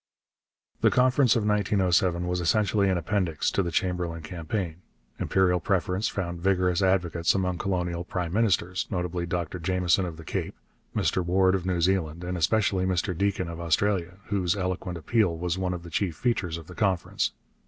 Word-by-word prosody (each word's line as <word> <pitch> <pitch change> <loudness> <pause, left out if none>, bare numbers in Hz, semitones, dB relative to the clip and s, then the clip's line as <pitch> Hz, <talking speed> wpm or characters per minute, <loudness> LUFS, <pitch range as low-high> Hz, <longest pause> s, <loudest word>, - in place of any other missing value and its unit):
The - - +4
Conference 125 0 +4
of 110 -3 +1
1907 95 -4 +2
was 90 0 -1
essentially 100 +3 +2
an 95 - +2
appendix 85 -2 0
to - - +1
the 85 - -2
Chamberlain 85 -1 -1
campaign. 85 +1 -4 0.4
Imperial 90 -2 +2
preference 95 +3 0
found 85 -3 -4
vigorous 90 -1 +2
advocates 90 -3 +2
among 90 -2 -1
colonial 90 -3 -1
prime 90 -1 -3
ministers, 95 -4 +1
notably 90 -2 -2
Dr 85 +1 -3
Jameson 90 +1 +1
of 80 -2 -7
the 80 - -11
Cape, - - -3 0.4
Mr 95 - +1
Ward 95 +2 +3
of 95 -1 -1
New 90 -2 0
Zealand, 85 -2 0
and 90 +1 -3
especially 95 +3 +2
Mr 90 0 0
Deakin 100 -1 0
of 85 0 -6
Australia, 90 +1 0
whose 95 -3 +1
eloquent 90 -2 -3
appeal 90 +1 +1
was 90 +1 -2
one 90 -1 -1
of 90 -1 -5
the 85 - -10
chief 90 -1 -1
features 90 -7 -1
of 85 - -10
the 90 - -11
Conference. 95 -4 0
90 Hz, 170 wpm, -27 LUFS, 85-95 Hz, 0.4 s, The